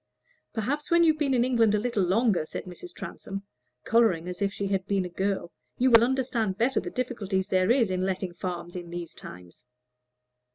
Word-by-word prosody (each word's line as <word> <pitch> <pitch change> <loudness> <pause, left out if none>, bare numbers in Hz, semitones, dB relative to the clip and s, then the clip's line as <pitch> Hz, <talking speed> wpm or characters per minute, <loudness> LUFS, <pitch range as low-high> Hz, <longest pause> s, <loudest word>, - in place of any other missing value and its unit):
"Perhaps 275 +7 -2
when 340 0 +5
you've 315 -2 +3
been 280 -3 +2
in 240 - +3
England 230 -4 +3
a - - +2
little 230 -2 0
longer," 190 0 +2
said - - -6
Mrs. 185 - -10
Transome, 195 - -7 0.4
coloring 215 -8 +3
as 180 +2 -6
if 200 0 +1
she 200 - -4
had 195 -1 -1
been 195 -2 +1
a - - -5
girl, 190 -1 -2 0.3
"you 255 +1 +3
will 230 0 +8
understand 240 -6 0
better 245 +4 +2
the - - -5
difficulty 225 -7 -2
there 185 0 +1
is 235 -5 +3
in 185 0 -1
letting 190 -1 -2
farms 175 -1 -5
these 175 -1 -6
times." 90 +6 -12
200 Hz, 190 wpm, -27 LUFS, 185-245 Hz, 0.4 s, will